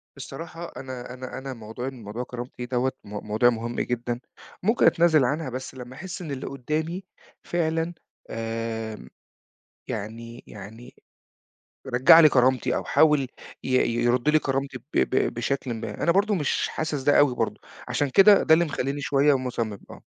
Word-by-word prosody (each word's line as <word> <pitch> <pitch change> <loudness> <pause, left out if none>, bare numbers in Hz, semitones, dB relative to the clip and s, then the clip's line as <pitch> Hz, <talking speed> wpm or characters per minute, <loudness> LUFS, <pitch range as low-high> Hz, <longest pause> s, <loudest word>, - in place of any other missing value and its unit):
بصراحة 170 +1 -8
أنا 130 -2 -7
أنا 130 0 -7
أنا 135 0 -6
موضوع 115 +2 -7
إن 130 -4 -8
موضوع 105 +4 -5
كرامتي 125 0 -7
دوّة 125 +1 0
م - - -14 0.2
موضوع 110 +3 +4
مهم 120 0 -3
جدًا، 120 0 -2 0.4
ممكن 225 +5 +3
أتنازل 165 -5 +5
عنها 145 +3 -1
بس 130 +1 -6
لمّا 125 0 -9
أحس 185 +5 -7
إن 160 -5 -6
اللي 135 -2 -5
قدامي 155 +7 -3 0.4
فعلًا 165 0 -1 0.4
آمم، 115 - -4 0.8
يعني 115 +3 -6
يعني 110 +4 -11 1.0
رجَّع 130 +6 +8
لي 155 -2 +8
كرامتي 130 -1 +2
أو - - -2
حاول 150 -2 +4 0.4
ي - - -5 0.3
يرد 120 +4 +2
لي 155 +1 +5
كرامتي 135 -1 -2
ب 120 - -21
ب 130 - +1
بشكلٍ 130 +1 -2
ما 115 - -5
أنا 170 - +4
برضه 200 +4 +2
مش 150 -6 0
حاسس 155 -3 -3
ده 145 +2 +4
أوي 140 -4 +4
برضه - - -2 0.3
عشان 145 -1 0
كده 195 +7 +7
ده 160 - +5
اللي 170 +2 +5
مخلّيني 145 -2 -3
شوية 140 0 +3
مصمم، 115 -5 -3
آه. - - -12
130 Hz, 160 wpm, -25 LUFS, 120-155 Hz, 1.0 s, رجَّع